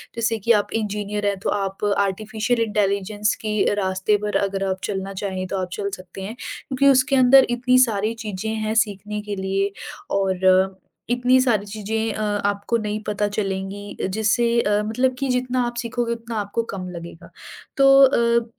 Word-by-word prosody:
जैसे 230 -1 0
कि 230 +4 +1
आप - - -5
इंजीनियर 210 -1 -2
हैं 200 -1 +1
तो - - -2
आप 195 -1 -2
आर्टिफिशियल 215 +4 0
इंटेलिजेंस 205 0 0
के 215 -1 -2 0.2
रास्ते 190 +1 +1
पर 210 - -2
अगर 195 0 -1
आप 190 0 -2
चलना 195 0 -3
चाहें 185 -1 -3
तो 195 - -3
आप 185 -1 -3
चल 200 -1 -3
सकते 185 +1 -11
हैं 210 +5 -6
क्योंकि 270 +2 -2
उसके 270 0 +4
अंदर 265 +1 +7
इतनी 250 +1 +2
सारी 215 +1 -1
चीज़ें 210 +1 -4
हैं 215 0 -2
सीखने 210 +1 -6
के 205 -1 -5
लिए 195 +1 -1 0.5
और 190 0 +2 0.3
इतनी 250 +1 +3
सारी 220 -6 +1
चीज़ें 220 +2 -3
अ, 215 - -4
आपको 205 +1 0
नहीं 215 -1 -3
पता 210 0 0
चलेंगी 200 0 -4
जिससे 230 +3 +1
अ, 210 0 +1
मतलब 250 +4 0
कि 275 - -1
जितना 250 0 0
आप 240 - -6
सीखोगे 235 0 -2
उतना 230 0 -7
आपको 205 +3 -2
कम 185 -1 -5
लगेगा। 170 -1 -10 0.5
तो 275 0 +6
अ 235 -3 +3
210 Hz, 170 wpm, -22 LUFS, 195-235 Hz, 0.5 s, अंदर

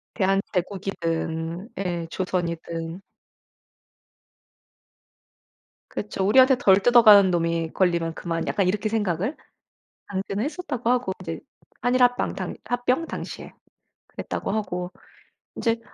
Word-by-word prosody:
대한제국이든 180 -2 -2
예 175 -3 -2
조선이든 170 -1 -3 2.9
그쵸. 205 -2 -3
'우리한테 260 +6 +6
덜 195 -5 +5
뜯어가는 210 -4 +7
놈이 165 -1 0
걸리면 170 -3 +1
그만.' 165 0 -3
약간 195 -3 +1
이렇게 210 +3 0
생각을 205 - -1 0.7
당시는 195 +1 -3
했었다고 280 -7 -3
하고 250 -6 +1
이제 165 -3 -4 0.5
한일 250 +1 +3
합방 245 0 +2
당 - - -4
합병 250 +6 0
당시에. - - -7 0.5
그랬다고 - - -4
하고 180 -4 -3 0.7
이제 230 -1 0
190 Hz, 250 characters per minute, -24 LUFS, 170-225 Hz, 2.9 s, 뜯어가는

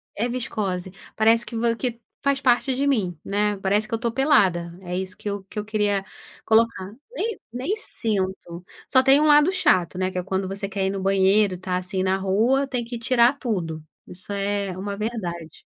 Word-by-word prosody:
é 230 +4 0
viscose. 205 -7 -3 0.2
Parece 225 +1 +4
que 235 - -8
vo 230 0 +1
que 240 -1 -3 0.2
faz 280 -1 +2
parte 255 0 +2
de 280 +2 0
mim, 190 - 0
né. 205 0 0
Parece 205 +3 0
que - - -8
eu - - +2
tô 235 -2 -1
pelada, 190 - +2
é 180 0 -4
isso 185 0 -4
que 205 - -5
eu 200 -1 -4
que 210 +2 -6
eu 210 - -4
queria 205 -2 0 0.4
colocar. 220 -4 +2 0.2
Nem 455 -3 -3
nem 260 - -2
sinto. 190 - -3 0.2
Só 260 -1 +4
tem 270 +2 +6
um 305 - +3
lado 295 +4 +6
chato, 185 - +2
né. 185 0 0
Que 185 - -6
é - - -3
quando 190 0 -2
você 195 +1 -4
quer 190 -1 -1
ir - - +1
no 195 - -3
banheiro, 195 0 +3
está 180 0 -2
assim 185 +1 -3
na 190 0 +1
rua, 225 +9 +2
tem 250 -3 -2
que 235 0 -6
tirar 240 +2 +4
tudo. 170 - -3 0.2
Isso 180 +3 -9
é 200 -1 -1
uma 200 +1 -4
verdade. 175 -8 -5
205 Hz, 200 wpm, -24 LUFS, 190-240 Hz, 0.4 s, tem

